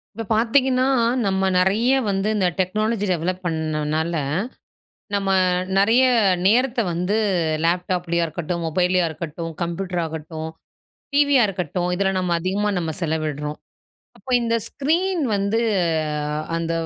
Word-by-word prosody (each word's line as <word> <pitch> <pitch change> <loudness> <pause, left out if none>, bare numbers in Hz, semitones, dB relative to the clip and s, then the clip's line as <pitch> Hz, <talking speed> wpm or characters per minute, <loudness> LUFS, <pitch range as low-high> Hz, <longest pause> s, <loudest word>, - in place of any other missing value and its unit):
இப்ப 225 - -4
பார்த்தீங்கன்னா, 255 +3 +2 0.4
நம்ம 190 -1 +1
நிறைய 205 +7 +3 0.2
வந்து 195 +1 0
இந்த 190 -3 +2
டெக்னாலஜி 215 +3 0
டெவலப் 180 +2 -2
பண்ணதுனால, 160 0 -1 1.0
நம்ம 195 -1 0 0.5
நிறைய 225 +6 +4 0.4
நேரத்த 245 +4 +3
வந்து 180 +5 0 0.5
லேப்டாப்லேயா 175 0 0
இருக்கட்டும், 170 +2 -4
மொபைல்லையா 180 +2 +2
இருக்கட்டும், 165 +1 -6
கம்ப்யூட்டரா 175 0 -2
இருக்கட்டும், 160 0 -6 0.7
டிவியா 285 -3 +4
இருக்கட்டும். 180 -2 -2
இதில 195 +1 +1
நம்ம 180 -2 0
அதிகமா 200 +4 0
நம்ம 165 -2 -2
செலவிடுறோம். 155 -2 -2 0.6
அப்போ 265 - -11
இந்த 230 0 0
ஸ்க்ரீன் 340 +5 0
வந்து 200 +3 0 1.0
அந்த 165 0 -2
185 Hz, 110 wpm, -22 LUFS, 165-215 Hz, 1.0 s, நிறைய